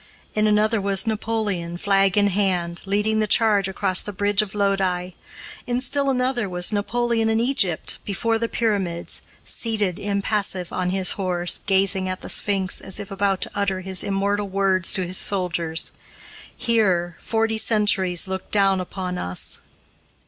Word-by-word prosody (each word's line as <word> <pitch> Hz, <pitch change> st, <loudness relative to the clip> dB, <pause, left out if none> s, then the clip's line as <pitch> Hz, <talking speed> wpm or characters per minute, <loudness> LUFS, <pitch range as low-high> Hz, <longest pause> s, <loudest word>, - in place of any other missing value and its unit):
In 215 Hz, 0 st, +2 dB
another 215 Hz, +1 st, +2 dB
was 195 Hz, -1 st, +2 dB
Napoleon, 210 Hz, -6 st, -2 dB
flag 195 Hz, +1 st, +2 dB
in 205 Hz, 0 st, +4 dB
hand, 180 Hz, -3 st, -1 dB
leading 210 Hz, +2 st, +1 dB
the 215 Hz, -, +1 dB
charge 210 Hz, -2 st, +3 dB
across 185 Hz, -1 st, 0 dB
the 205 Hz, -, -5 dB
bridge 205 Hz, +1 st, +2 dB
of 210 Hz, -1 st, -6 dB
Lodi. 190 Hz, -3 st, 0 dB, 0.6 s
In 245 Hz, 0 st, 0 dB
still 275 Hz, +2 st, 0 dB
another 250 Hz, -4 st, 0 dB
was 180 Hz, +3 st, 0 dB
Napoleon 225 Hz, +2 st, 0 dB
in 220 Hz, 0 st, +2 dB
Egypt, 230 Hz, -, 0 dB
before 225 Hz, +3 st, -1 dB
the 230 Hz, 0 st, -1 dB
Pyramids, 195 Hz, -7 st, -2 dB, 0.2 s
seated, 210 Hz, -6 st, -2 dB
impassive, 200 Hz, -2 st, -1 dB
on 180 Hz, -1 st, -1 dB
his 185 Hz, -1 st, +1 dB
horse, 180 Hz, -3 st, 0 dB
gazing 190 Hz, -1 st, +3 dB
at 185 Hz, -, -4 dB
the -, -, -8 dB
Sphinx, 195 Hz, -3 st, +1 dB
as 190 Hz, -, -1 dB
if 200 Hz, -1 st, -8 dB
about 195 Hz, -1 st, 0 dB
to -, -, -1 dB
utter 195 Hz, -2 st, -1 dB
his 190 Hz, 0 st, -2 dB
immortal 200 Hz, +1 st, -1 dB
words 190 Hz, -2 st, +2 dB
to 185 Hz, -, +1 dB
his 180 Hz, +2 st, -1 dB
soldiers: 175 Hz, -4 st, +1 dB, 0.7 s
"Here, 190 Hz, -8 st, +1 dB
forty 225 Hz, -1 st, 0 dB
centuries 205 Hz, -5 st, +2 dB
look 190 Hz, 0 st, -5 dB
down 195 Hz, -2 st, +3 dB
upon 180 Hz, 0 st, -5 dB
us." 90 Hz, +1 st, -2 dB
195 Hz, 155 wpm, -22 LUFS, 185-215 Hz, 0.7 s, in